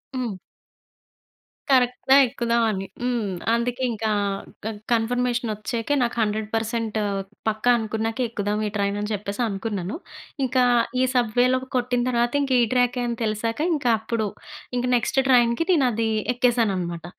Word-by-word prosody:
హ్మ్. 245 -5 -2 1.4
కరెక్ట్‌గా 255 +1 +4
ఎక్కుదాం 235 -2 0
అని. 195 -2 -2 0.2
హ్మ్, 240 -4 -1 0.3
అందుకే 245 +2 -1
ఇంకా 220 0 -2 0.5
క - - -3 0.3
కన్ఫర్మేషన్ 240 0 0
వచ్చాకే 230 +5 -3
నాకు 240 0 -1
100 215 0 -1
పర్సెంట్ 225 0 -2 0.5
పక్కా 220 +3 +1
అనుకున్నాకే 225 +2 -2
ఎక్కుదాం, 210 -1 -2
ఈ - - -2
ట్రైన్ 200 0 0
అని 210 +1 -3
చెప్పేసి 205 +3 -4
అనుకున్నాను. 200 - -3 0.5
ఇంకా 255 0 +2 0.4
ఈ - - +4
సబ్వేలో 245 +2 +3 0.2
కొట్టిన 245 0 +1
తర్వాత, 240 0 +1
ఇంక 275 -1 -2
ఈ - - +4
ట్రాకె 245 0 +2
అని 235 -1 -3
తెలిసాక, 220 +3 -2 0.2
ఇంక 280 - -6
అప్పుడు 220 -1 -2 0.5
ఇంక, 245 - 0
నెక్స్ట్ 245 +3 +1
ట్రైన్‍కి 240 +4 +4
నేను 290 -7 +4
అది 225 0 0 0.2
ఎక్కేసాను 240 -4 +2
అనమాట. 170 -1 -4
235 Hz, 140 wpm, -24 LUFS, 215-245 Hz, 1.4 s, కరెక్ట్‌గా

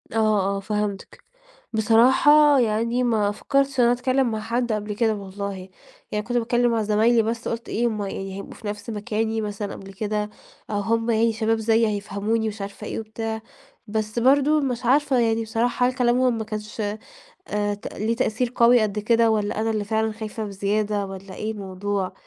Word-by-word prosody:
آه، 210 -3 +2
آه - - -3
فهمتِك، 210 -1 -4 0.5
بصراحة 265 +7 +5
يعني 230 +2 +1
ما 215 -4 +2
فكرتش 275 +5 0
إن - - +6
أنا 240 - +4
أتكلم 255 0 +1
مع 220 - -2
حد 235 +2 -1
قبل 210 0 -2
كده 220 0 +1
والله، 195 -1 -6 0.4
يعني 210 0 -1
كنت 245 +1 -1
باتكلم 240 +1 +2
مع 230 -1 +1
زمايلي 220 +3 +3
بس 230 +1 -3
قُلت 230 0 -4
إيه 240 +2 +1
هُم 215 -2 -2
هيبقوا 195 0 -5
في 215 - -9
نَفس 205 +3 -5
مكاني 220 +1 -2
مثلًا 205 -1 -4
قبل 195 0 -10
كده، 210 +1 -2 0.4
هُم 225 +3 0
يعني 225 0 +3
شباب 225 0 +1
زي 225 +1 +2
هيفهموني 210 +2 -1
مش 215 -1 -5
عارفة 200 0 -7
إيه - - -4
وبتاع، 220 0 -4 0.5
بس 215 +1 -2
برضو 285 +5 +4
مش 250 -3 -2
عارفة 270 +1 +3
يعني 225 -1 +1
بصراحة 235 +2 +1
هل 255 - -1
كلامهُم 250 -1 +2
ما 220 - -2
كانش 215 0 -6 0.7
آآ، 205 0 0
ت 205 - -9
ليه 225 +3 0
تأثير 245 0 0
قوي 240 0 +6
قدّ 210 -1 -1
كده 230 +2 +3
والّا 210 -1 0
أنا 225 +1 0
اللي 215 -2 -1
فعلًا 220 +1 0
خايفة 220 0 -5
بزيادة 205 +1 -1
والّا 195 0 -9
إيه 215 +3 -3
الموضوع؟ 195 -1 -3
220 Hz, 180 wpm, -23 LUFS, 205-235 Hz, 0.7 s, إن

